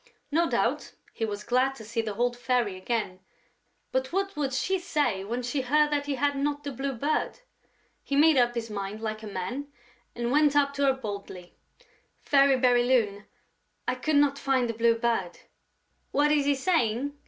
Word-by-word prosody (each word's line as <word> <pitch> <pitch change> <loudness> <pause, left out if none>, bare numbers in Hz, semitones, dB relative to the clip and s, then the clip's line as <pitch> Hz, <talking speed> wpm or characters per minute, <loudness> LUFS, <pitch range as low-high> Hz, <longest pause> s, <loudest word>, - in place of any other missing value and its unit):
No 335 +3 +2
doubt, - - -1 0.2
he 225 - -2
was 210 -1 -5
glad 255 +3 +1
to 225 - -11
see 230 +2 -2
the 215 -2 -5
old 245 +2 0
Fairy 245 -5 0
again; 185 -1 -3 0.7
but 260 0 -1
what 390 +2 -1
would 285 -3 -1
she 320 +10 0
say 265 - -1
when 240 +5 -3
she 255 +3 -1
heard 295 +4 +2
that 290 -1 -1
he 285 - -1
had 285 +2 0
not 290 +1 -2
the 285 - -4
Blue 270 +2 -3
Bird? 295 - -2 0.6
He 280 - -3
made 310 +2 +6
up 240 -2 +3
his 230 -1 -3
mind 200 +1 -4
like 215 -1 -4
a 220 - -8
man 210 +9 -4 0.5
and 240 0 -2
went 295 0 +4
up 280 -1 +3
to 280 0 0
her 270 - +4
boldly: 200 -7 -7 0.7
"Fairy 275 -1 +4
Bérylune, 245 -5 +2 0.6
I - - +2
could 290 +5 -1
not 285 -1 +3
find 265 -3 +1
the 230 - -2
Blue 230 +1 +3
Bird...." 230 -7 -1 0.7
"What 295 +1 +2
is 295 -2 +2
he 285 0 +3
saying?" 275 -3 0
255 Hz, 185 wpm, -27 LUFS, 225-285 Hz, 0.7 s, made